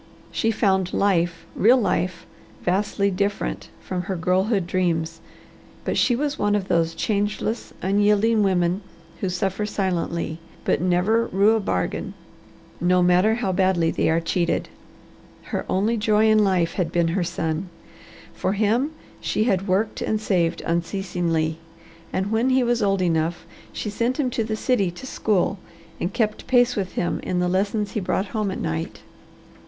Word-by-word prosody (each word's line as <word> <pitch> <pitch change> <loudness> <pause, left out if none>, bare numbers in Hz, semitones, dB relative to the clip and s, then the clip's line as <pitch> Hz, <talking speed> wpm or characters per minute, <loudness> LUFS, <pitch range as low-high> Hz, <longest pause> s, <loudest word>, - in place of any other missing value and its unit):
She 225 - 0
found 190 -4 +1
life, 175 -4 +1
real 240 +6 +5
life, 180 -6 -1 0.4
vastly 200 +2 +1
different 190 - -2
from 185 -1 -3
her 185 +2 -3
girlhood 185 +3 +1
dreams, 165 -2 -1 0.6
but - - -1
she 245 - +3
was 290 +3 -2
one 205 0 +2
of 195 -2 -1
those 165 -2 +1
changeless, 210 +4 -1
unyielding 210 +3 +3
women 185 -1 +1 0.4
who 190 - -1
suffer 190 +3 -1
silently, 170 -5 -2 0.3
but - - +1
never 185 +6 +2
rue 200 +4 +3
a - - +1
bargain, 90 - -2 0.6
no 180 +1 +3
matter 180 +5 +4
how 225 -5 -1
badly 185 -3 +2
they - - +1
are 165 +1 +3
cheated. 170 +1 -1 0.7
Her - - -4
only 210 +5 +1
joy 215 0 +3
in 215 - +5
life 180 -4 +1
had 180 -4 -1
been 170 -1 +2
her 180 +2 0
son. 170 +1 -2 0.6
For 190 - -1
him 225 +8 +1 0.3
she - - 0
had 195 -4 +1
worked 200 +4 0
and 215 - 0
saved 175 -5 0
unceasingly, 170 -2 -1 0.5
and 190 +2 -1
when 230 +4 +2
he 260 0 +3
was 240 -1 +1
old 195 -2 +2
enough 165 -1 0 0.3
she 210 - -4
sent 235 +6 -1
him 255 -4 +1
to 230 - 0
the 220 0 -2
city 210 -4 +1
to 175 +9 -9
school 200 -6 0 0.4
and 180 - -2
kept 220 -3 -1
pace 245 -1 +4
with 190 -3 -3
him 175 - -1
in 180 - -2
the 180 0 +1
lessons 200 +3 0
he - - -2
brought 190 +1 -1
home 215 -3 0
at 190 - -4
night. 80 0 -3
195 Hz, 160 wpm, -23 LUFS, 175-215 Hz, 0.7 s, real